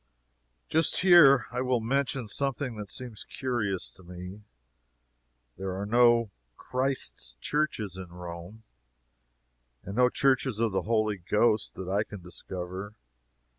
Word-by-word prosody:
Just 160 0 +2
here 170 -8 +7
I 125 +1 -2
will 125 -1 +1
mention 130 +1 -1
something 135 +1 -2
that 105 -2 -7
seems 120 +1 -6
curious 120 -8 -2
to - - -19
me. 90 +3 -9 1.2
There 95 -1 -3
are 100 - -3
no 120 0 +4 0.3
"Christ's 125 - -2
Churches" 110 - -1
in 95 -2 -8
Rome, 90 +4 -9 1.2
and 100 - -7
no 125 0 +5
"Churches 130 -4 +1
of 115 -2 +1
the 95 - 0
Holy 110 -2 +2
Ghost," 105 +4 +1
that 95 - -6
I 100 +3 +1
can 105 -2 -9
discover. 95 +3 -7
110 Hz, 130 wpm, -28 LUFS, 95-125 Hz, 1.2 s, here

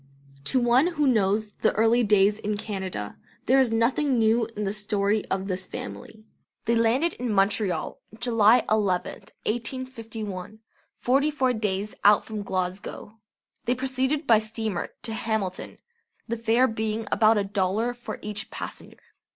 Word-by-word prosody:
To 260 - +2
one 245 +5 +4
who 315 -4 0
knows 215 -3 +2
the - - +3
early 225 +3 +3
days 205 0 +4
in 210 0 -2
Canada 190 - -5 0.3
there 265 +2 +4
is 255 -4 +3
nothing 250 +4 +2
new 225 0 +3
in 210 - -1
the 195 0 -1
story 210 0 0
of 190 0 -2
this 185 -1 -2
family. 105 - -8 0.4
They 235 - +2
landed 240 +9 +2
in 245 -1 -3
Montreal 195 -3 0 0.2
July 230 -1 +4
11th, 200 -4 0 0.2
1851, 225 -5 -5 0.4
forty 275 +4 +2
four 265 -4 +1
days 210 -2 -2
out 205 0 +6
from 215 -1 -5
Glasgow. 190 +3 -4 0.5
They 245 - +1
proceeded 265 +3 -1
by 225 -2 +6
steamer 220 -3 -3
to 225 - -3
Hamilton, 220 -5 -3 0.5
the 235 - -1
fare 230 +3 +3
being 220 -1 -3
about 220 0 +4
a 205 - +2
dollar 200 +4 0
for 245 0 -7
each 210 0 -5
passenger. - - -8
220 Hz, 145 wpm, -26 LUFS, 205-240 Hz, 0.5 s, out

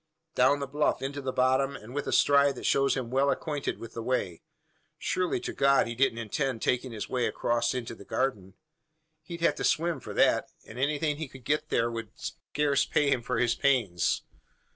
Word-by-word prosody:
"Down 140 +3 +4
the - - -1
bluff 145 0 0
into 140 +1 -3
the 130 -1 -2
bottom 130 +2 +2
and 110 +4 -10
with 145 0 -3
a - - -1
stride 140 -1 +4
that - - -7
shows 135 0 +3
him 125 -3 -4
well 135 +2 +3
acquainted 145 0 -2
with 115 -1 -10
the 115 - -5
way. 110 -8 -2 0.6
Surely 180 -7 -1
to - - -4
God 140 0 +4
he 120 - -4
don't 125 -1 +1
intend 115 +2 -2
making 125 0 0
his 110 -2 -5
way 125 -2 0
across 120 +1 0
into 120 -2 -4
the 105 - -12
garden? 100 -5 -2 0.7
He'd 170 +2 -8
have 170 - +4
to - - -3
swim 170 +1 +1
for - - -8
that; - - +3 0.2
and 115 - -10
anything 150 +2 0
he 160 -1 -4
could 130 -2 -14
get 150 +1 0
there 115 +1 +1
would 115 -2 -5
scarce 145 -2 -1
pay 145 -2 +1
him 130 -3 +2
for 125 +1 -2
his 120 0 +2
pains. 115 -12 +1
130 Hz, 205 wpm, -28 LUFS, 120-140 Hz, 0.7 s, Down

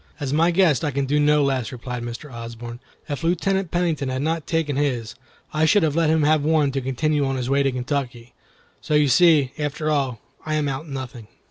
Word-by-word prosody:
"As 140 -2 -3
my 165 +3 +3
guest, 170 -7 +3
I 150 - +1
can 140 0 -1
do 145 +2 +1
no 150 0 +4
less," 130 -5 -1
replied 125 0 -6
Mr. 120 +4 -7
Osborne. 115 0 -8 0.3
"If 145 0 -4
Lieutenant 185 +2 0
Pennington 165 -6 -1
had 130 +1 -2
not 160 0 -2
taken 160 -4 0
his, 125 -6 -1 0.4
I 155 +1 +2
should 170 +4 +4
have 155 -2 +1
let 165 -2 +2
him 160 -1 +3
have 155 0 +3
one 150 -2 +2
to 135 0 -2
continue 145 +3 0
on 135 -1 -1
his 130 0 -3
way 140 0 +3
to 135 -1 +1
Kentucky. 125 -2 -4 0.5
So 150 - -1
you 150 -1 +4
see, 145 -1 +5
after 150 +1 -2
all, 135 -6 -1 0.2
I 155 -1 -2
am 150 -1 0
out 140 +3 -4
nothing." 130 -5 -7
145 Hz, 215 wpm, -22 LUFS, 130-155 Hz, 0.5 s, see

